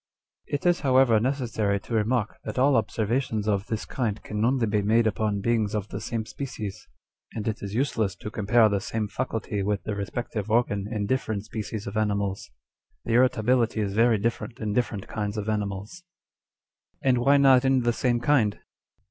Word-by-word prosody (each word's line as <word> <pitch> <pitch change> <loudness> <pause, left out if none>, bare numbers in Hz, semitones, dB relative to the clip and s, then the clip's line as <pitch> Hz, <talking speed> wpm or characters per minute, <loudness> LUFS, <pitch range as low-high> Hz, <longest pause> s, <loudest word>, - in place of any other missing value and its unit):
" - - -58
It 145 - -4
is 175 0 +4
however 130 -5 +4
necessary 115 -5 0
to - - -8
remark, 110 0 0
that 110 - -6
all 135 +3 +4
observa 115 +2 +1
tions 110 -5 -3
of 100 -1 0
this 110 -1 -3
kind 110 -5 -2
can 105 0 -3
only 125 0 +2
be 105 -1 +1
made 110 +3 +3
upon 105 -1 0
beings 110 -1 +1
of 105 -1 -3
the - - -5
same 115 -2 -3
species, 110 -7 -6 0.5
and 110 -1 -4
it 110 -1 -2
is 100 +1 -5
useless 115 -6 0
to 105 - -8
compare 110 +2 +4
the 100 -2 0
same 110 +1 -2
faculty 110 -3 -3
with 100 0 -1
the 105 - -3
respective 105 +1 -4
organ 105 -3 +1
in 105 -3 -1
different 110 -3 -1
species 110 -1 -5
of 100 +2 -4
animals. 100 -2 -1 0.6
The 115 - -1
irritability 120 -1 +3
is 100 -2 -1
very 115 +1 +4
different 115 +3 -3
in 105 -2 -2
different 110 -4 -1
kinds 105 -1 -3
of 105 0 -3
animals." 105 - -3 1.0
2 135 - +2
And 125 - +4
why 140 +4 +4
not 135 -2 +6
in 135 -1 +3
the 120 0 +1
same 120 0 +1
kind 120 -5 +2
110 Hz, 190 wpm, -26 LUFS, 105-120 Hz, 1.0 s, not